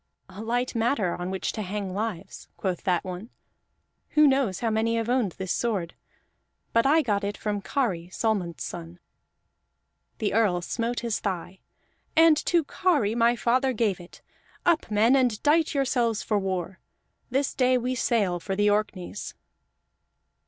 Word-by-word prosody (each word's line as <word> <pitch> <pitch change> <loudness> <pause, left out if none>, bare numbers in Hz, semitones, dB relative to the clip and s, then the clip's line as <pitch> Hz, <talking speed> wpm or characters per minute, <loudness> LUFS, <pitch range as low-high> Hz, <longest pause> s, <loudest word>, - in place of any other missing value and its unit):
"A 190 +3 -9
light 245 +3 -1
matter 225 -5 +1
on 175 +1 -4
which 190 0 -2
to 215 - -5
hang 195 -1 -4
lives," 200 -3 -5
quoth 185 -3 -2
that 180 -3 +1
one. 185 +4 -7 0.9
"Who 300 - +8
knows 265 -9 +2
how 230 -2 +1
many 225 +1 +1
have 230 0 -1
owned 245 -8 +1
this 185 -1 -4
sword? 200 -8 -1 0.8
But 230 +3 +4
I 315 +3 +4
got 205 -5 0
it 205 +1 -3
from 205 -1 -2
Kari, 195 -10 -1
Solmund's 185 - -1
son." 170 0 -7 1.2
The 215 -3 -1
Earl 200 -5 +2
smote 235 +5 -2
his 235 -2 -1
thigh. 185 -1 -4 0.6
"And 325 -1 +7
to 340 -2 +3
Kari 290 - +1
my 235 +1 +3
father 255 +3 +1
gave 210 -5 0
it! 175 0 -14 0.4
Up, 340 -7 +2
men, 220 +5 +4
and 245 -5 +2
dight 310 +1 +3
yourselves 245 -5 +1
for 210 -2 +1
war! 185 -1 -3 0.5
This 270 +2 0
day 255 -1 +3
we 250 +1 -1
sail 215 -7 +1
for 190 +3 -3
the 205 +1 +3
Orkneys." 205 -2 -3
220 Hz, 155 wpm, -26 LUFS, 190-245 Hz, 1.2 s, Who